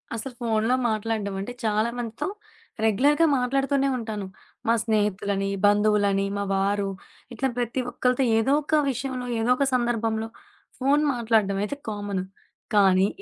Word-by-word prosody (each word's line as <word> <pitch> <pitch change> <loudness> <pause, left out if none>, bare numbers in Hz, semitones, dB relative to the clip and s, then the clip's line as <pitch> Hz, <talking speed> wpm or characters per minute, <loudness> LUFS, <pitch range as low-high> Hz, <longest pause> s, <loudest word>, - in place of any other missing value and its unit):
అసలు 250 +3 -5
ఫోన్లో 225 +1 +1
మాట్లాడడం 215 -2 -2
అంటే 245 +5 -5
చాలామందితో 225 - -1 0.6
రెగ్యులర్‌గా 285 +9 +4
మాట్లాడుతూనే 275 +2 +1
ఉంటాను. 220 -4 -4 0.4
మా 230 - +5
స్నేహితులని, 200 -2 0 0.2
బంధువులని, 205 -1 +3
మా 200 - -1
వారు 200 +1 0 0.4
ఇట్లా 270 - -1
ప్రతి 245 +1 -1
ఒక్కళ్ళతో 250 +2 +1
ఏదో 225 +4 +2
ఒక 310 - +1 0.2
విషయంలో 255 0 -4
ఏదోక 250 +4 +2
సందర్భంలో 225 -2 0 0.5
ఫోను 280 +3 +3
మాట్లాడడం 220 -4 +1
అయితే 210 - -3
కామను. 205 -3 -3 0.5
కానీ 190 -1 +5
225 Hz, 120 wpm, -25 LUFS, 205-250 Hz, 0.6 s, మా